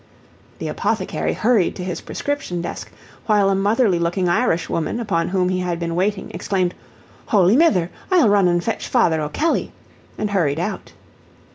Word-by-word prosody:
The -, -, -5 dB
apothecary -, -, -1 dB
hurried 225 Hz, -5 st, +2 dB
to 180 Hz, -, -6 dB
his 180 Hz, -1 st, -4 dB
prescription 285 Hz, -12 st, -3 dB
desk, 170 Hz, 0 st, -6 dB, 0.4 s
while 205 Hz, -3 st, +3 dB
a -, -, +2 dB
motherly 200 Hz, -1 st, +2 dB
looking 175 Hz, +2 st, 0 dB
Irish 175 Hz, -2 st, +1 dB
woman 165 Hz, +8 st, -2 dB
upon 170 Hz, -8 st, -1 dB
whom 185 Hz, -1 st, +1 dB
he 185 Hz, 0 st, 0 dB
had 175 Hz, -2 st, -2 dB
been 170 Hz, -1 st, -3 dB
waiting, 190 Hz, +3 st, -1 dB
exclaimed, 185 Hz, 0 st, -1 dB, 0.5 s
"Holy 200 Hz, -4 st, +4 dB
Mither! 200 Hz, -, +3 dB, 0.2 s
I'll 360 Hz, -, +4 dB
run 200 Hz, -2 st, +4 dB
an' 175 Hz, 0 st, +2 dB
fetch 225 Hz, +6 st, -3 dB
Father 165 Hz, -11 st, +2 dB
O'Kelley," 155 Hz, -, -1 dB, 0.5 s
and 210 Hz, -1 st, -2 dB
hurried 160 Hz, -7 st, +1 dB
out. 195 Hz, +5 st, -4 dB
185 Hz, 160 wpm, -20 LUFS, 175-215 Hz, 0.5 s, Holy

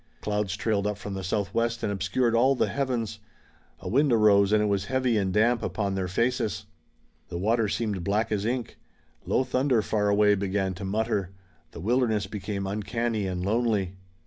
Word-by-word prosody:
Clouds 105 Hz, -2 st, -1 dB
trailed 105 Hz, -1 st, 0 dB
up 105 Hz, -1 st, -2 dB
from 100 Hz, 0 st, -6 dB
the 95 Hz, -1 st, -4 dB
southwest 110 Hz, +5 st, -1 dB
and 105 Hz, -, 0 dB
obscured 100 Hz, +5 st, 0 dB
all 130 Hz, +4 st, +4 dB
the -, -, +1 dB
heavens. 120 Hz, -6 st, -2 dB, 0.6 s
A -, -, -7 dB
wind 140 Hz, +3 st, +3 dB
arose 105 Hz, -3 st, +5 dB
and 105 Hz, 0 st, +4 dB
it -, -, +2 dB
was 100 Hz, -1 st, 0 dB
heavy 130 Hz, 0 st, +1 dB
and 95 Hz, -3 st, +1 dB
damp 115 Hz, +4 st, +3 dB
upon 100 Hz, -2 st, -2 dB
their 95 Hz, -1 st, -2 dB
faces. 110 Hz, +1 st, -1 dB, 0.6 s
The 85 Hz, -, -4 dB
water 110 Hz, +3 st, +1 dB
seemed 105 Hz, -5 st, -2 dB
black 105 Hz, +5 st, 0 dB
as 100 Hz, -2 st, 0 dB
ink. 120 Hz, +1 st, -3 dB, 0.5 s
Low -, -, +2 dB
thunder 130 Hz, -3 st, +1 dB
far 105 Hz, -1 st, 0 dB
away 105 Hz, 0 st, +4 dB
began 95 Hz, -1 st, -1 dB
to 95 Hz, +2 st, -7 dB
mutter. 105 Hz, -2 st, -1 dB, 0.4 s
The -, -, -10 dB
wilderness 110 Hz, -1 st, +1 dB
became 100 Hz, 0 st, -4 dB
uncanny 110 Hz, +1 st, -2 dB
and 90 Hz, -1 st, -3 dB
lonely. 105 Hz, -4 st, +1 dB
105 Hz, 175 wpm, -27 LUFS, 100-115 Hz, 0.6 s, arose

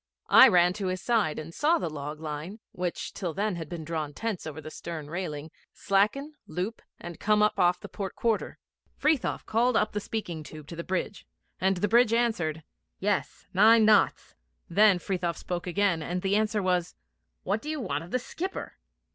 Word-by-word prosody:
I 260 Hz, -, +10 dB
ran 180 Hz, -5 st, +4 dB
to 190 Hz, -, -1 dB
his 185 Hz, 0 st, -2 dB
side 210 Hz, -5 st, +1 dB
and 155 Hz, +2 st, -7 dB
saw 315 Hz, -, +3 dB
the -, -, -2 dB
log 150 Hz, 0 st, -6 dB
line, 160 Hz, +6 st, -6 dB
which 180 Hz, -1 st, -4 dB
till 175 Hz, -5 st, -4 dB
then 205 Hz, 0 st, 0 dB
had 160 Hz, -3 st, -6 dB
been 170 Hz, -2 st, -5 dB
drawn 155 Hz, -3 st, -3 dB
tense 225 Hz, -7 st, -3 dB
over 155 Hz, 0 st, -6 dB
the 155 Hz, 0 st, -8 dB
stern 155 Hz, -3 st, -7 dB
railing, 160 Hz, -4 st, -4 dB, 0.2 s
slacken, 215 Hz, +10 st, +1 dB
loop, 185 Hz, +8 st, -4 dB, 0.2 s
and 175 Hz, -2 st, -8 dB
come 210 Hz, 0 st, +3 dB
up 210 Hz, -, +1 dB
off 180 Hz, 0 st, +3 dB
the -, -, -9 dB
port 195 Hz, -3 st, -6 dB
quarter. 230 Hz, -2 st, -1 dB, 0.4 s
Frithiof 305 Hz, -4 st, +1 dB
called 230 Hz, +1 st, +2 dB
up 215 Hz, -, +1 dB
the 210 Hz, -, -2 dB
speaking 200 Hz, -7 st, -4 dB
tube 155 Hz, 0 st, -10 dB
to 170 Hz, -, -7 dB
the 170 Hz, -, -5 dB
bridge, 190 Hz, +2 st, -3 dB, 0.3 s
and 190 Hz, 0 st, +2 dB
the 205 Hz, -, +1 dB
bridge 235 Hz, 0 st, +4 dB
answered, 175 Hz, -10 st, 0 dB, 0.3 s
'Yes, 205 Hz, +1 st, -2 dB
nine 220 Hz, +3 st, +6 dB
knots.' 210 Hz, -2 st, +3 dB, 0.3 s
Then 205 Hz, +2 st, +5 dB
Frithiof 175 Hz, -1 st, -2 dB
spoke 175 Hz, 0 st, -4 dB
again, 185 Hz, -2 st, +1 dB
and 180 Hz, +3 st, -3 dB
the 195 Hz, +1 st, +2 dB
answer 215 Hz, -1 st, +1 dB
was, 180 Hz, -1 st, 0 dB, 0.5 s
'What 205 Hz, +3 st, -1 dB
do 300 Hz, -, -6 dB
you 310 Hz, -1 st, -2 dB
want 165 Hz, -, -2 dB
of 170 Hz, -, -11 dB
the 255 Hz, -, +1 dB
skipper?' 360 Hz, +9 st, -6 dB
185 Hz, 190 wpm, -28 LUFS, 165-215 Hz, 0.5 s, I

